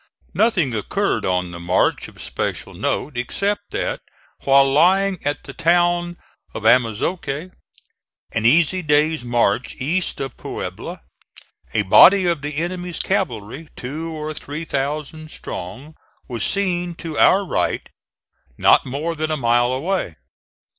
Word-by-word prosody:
Nothing 180 - +2
occurred 105 -2 -1
on 90 -1 0
the 85 - -8
march 90 +2 +1
of - - -16
special - - -3
note, 145 - -2
except 200 +12 -2
that - - -3 0.4
while 135 0 +6
lying 190 +5 +3
at 145 0 -2
the 135 - -9
town 175 +1 +2 0.4
of - - -5
Amozoque 135 - +1 0.8
an 110 - 0
easy 165 +9 +4
day's 150 -2 +2
march 120 -1 0
east 170 +8 -1
of 135 -1 -4
Puebla - - -6 0.7
a 105 - +3
body 185 - +7
of 170 -4 0
the 145 0 -5
enemy's 175 +1 -3
cavalry, 150 - -2
two 155 +6 -5
or 155 -1 -5
three 150 +2 -6
thousand 150 +2 -3
strong, 115 - -8 0.3
was 120 -5 -3
seen 175 -3 0
to 160 -2 -5
our 195 +1 +5
right, - - -1 0.7
not - - +4
more 150 +6 -2
than 155 0 -2
a 155 - 0
mile 120 -1 +2
away. 140 - -2
150 Hz, 135 wpm, -21 LUFS, 125-175 Hz, 0.8 s, body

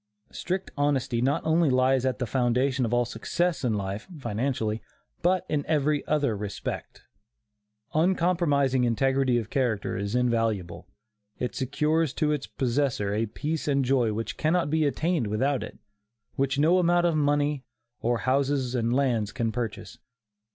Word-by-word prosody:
Strict 185 +2 -3
honesty 140 -5 0
not 135 +3 +1
only 160 0 +3
lies 130 0 +3
at 130 - -1
the 125 - -2
foundation 125 +1 +1
of 115 - -3
all 120 0 +2
success 165 +8 -1
in 115 -4 +1
life 100 +1 -4
(financially), 115 -3 -2 0.4
but 180 +1 +2
in 150 -2 -1
every 150 -1 +1
other 145 -7 +1
respect. 100 -1 -6 0.9
Uncompromising 160 -6 +2
integrity 130 +1 +2
of 115 -1 -4
character 120 -7 0
is 100 +3 -3
invaluable. 115 -7 0 0.5
It 125 - -3
secures 150 +3 0
to 150 +2 0
its 150 -2 -2
possessor 125 -5 -1
a 110 +2 0
peace 150 +9 -3
and 140 -2 +2
joy 125 -4 +2
which 110 +2 -4
cannot 160 -1 +1
be 160 -1 +2
attained 160 -3 0
without 130 +6 0
it - - -8 0.6
which 135 0 0
no 165 +5 +4
amount 175 0 +3
of 170 -2 +2
money, 145 -1 +1 0.4
or 120 +1 +1
houses 135 -1 +1
and 120 -2 0
lands 120 -5 +1
can 115 -3 -1
purchase. 120 0 -5
135 Hz, 150 wpm, -27 LUFS, 120-150 Hz, 0.9 s, no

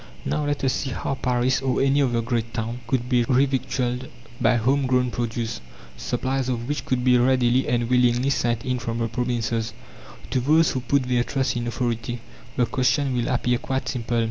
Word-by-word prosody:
Now, 150 -1 -1
let 145 -1 -2
us 130 - +2
see 135 - -2
how 130 - -3
Paris 125 0 +1
or 130 -1 0
any 140 +1 +3
other 120 -4 +1
great 115 0 -2
town 115 +1 -3
could 125 -1 0
be 125 -2 +3
revictualled 130 -1 0 0.3
by 120 - +4
home 130 +4 +2
grown 125 -1 +2
produce, 115 -1 -3 0.3
supplies 130 - -2
of 120 -1 -2
which 145 +1 -3
could 125 -1 0
be 125 -1 +5
readily 125 0 +3
and 120 -1 +1
willingly 125 +1 +3
sent 120 -3 0
in 125 -1 -1
from 115 -1 -3
the 115 0 0
provinces. 115 -1 -2 0.6
To 130 - +2
those 155 +5 +4
who 130 - -1
put 135 +2 +1
their 125 -1 +1
trust 130 -1 -1
in 120 0 -2
"authority" 120 0 -2 0.4
the 125 - +3
question 130 +2 +1
will 120 -1 0
appear 125 -1 +1
quite 130 0 -2
simple. 120 -2 -1
125 Hz, 190 wpm, -24 LUFS, 120-130 Hz, 0.6 s, be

